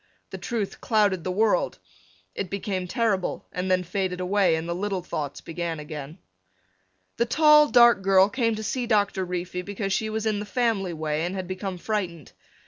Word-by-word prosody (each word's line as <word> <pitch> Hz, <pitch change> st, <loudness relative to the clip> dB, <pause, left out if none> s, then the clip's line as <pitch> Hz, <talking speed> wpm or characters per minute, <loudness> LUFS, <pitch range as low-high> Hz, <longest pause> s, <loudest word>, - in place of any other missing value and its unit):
The -, -, -6 dB
truth 225 Hz, -5 st, -3 dB
clouded 205 Hz, -6 st, +2 dB
the 185 Hz, -, -2 dB
world. 205 Hz, 0 st, +1 dB, 0.6 s
It 190 Hz, -, -4 dB
became 190 Hz, -1 st, -3 dB
terrible 215 Hz, -3 st, -1 dB
and 180 Hz, +1 st, -3 dB
then 185 Hz, 0 st, +2 dB
faded 180 Hz, 0 st, -2 dB
away 185 Hz, -1 st, +2 dB
and 160 Hz, +1 st, -4 dB
the 170 Hz, -, -1 dB
little 190 Hz, 0 st, -2 dB
thoughts 145 Hz, -5 st, -4 dB
began 165 Hz, -1 st, -4 dB
again. 150 Hz, +1 st, -7 dB, 1.0 s
The 235 Hz, -, +1 dB
tall 300 Hz, +3 st, +6 dB
dark 235 Hz, -4 st, +6 dB
girl 195 Hz, 0 st, +5 dB
came 230 Hz, 0 st, 0 dB
to 215 Hz, -, -5 dB
see 245 Hz, +3 st, -2 dB
Doctor 205 Hz, -4 st, +1 dB
Reefy 180 Hz, 0 st, -4 dB
because 195 Hz, +1 st, -3 dB
she 220 Hz, +2 st, 0 dB
was 220 Hz, 0 st, -3 dB
in 215 Hz, -2 st, 0 dB
the 210 Hz, -, -4 dB
family 225 Hz, -7 st, 0 dB
way 155 Hz, -1 st, -2 dB
and 180 Hz, +3 st, -2 dB
had 185 Hz, -2 st, -4 dB
become 185 Hz, 0 st, -4 dB
frightened. 175 Hz, -, -3 dB
195 Hz, 180 wpm, -25 LUFS, 180-215 Hz, 1.0 s, tall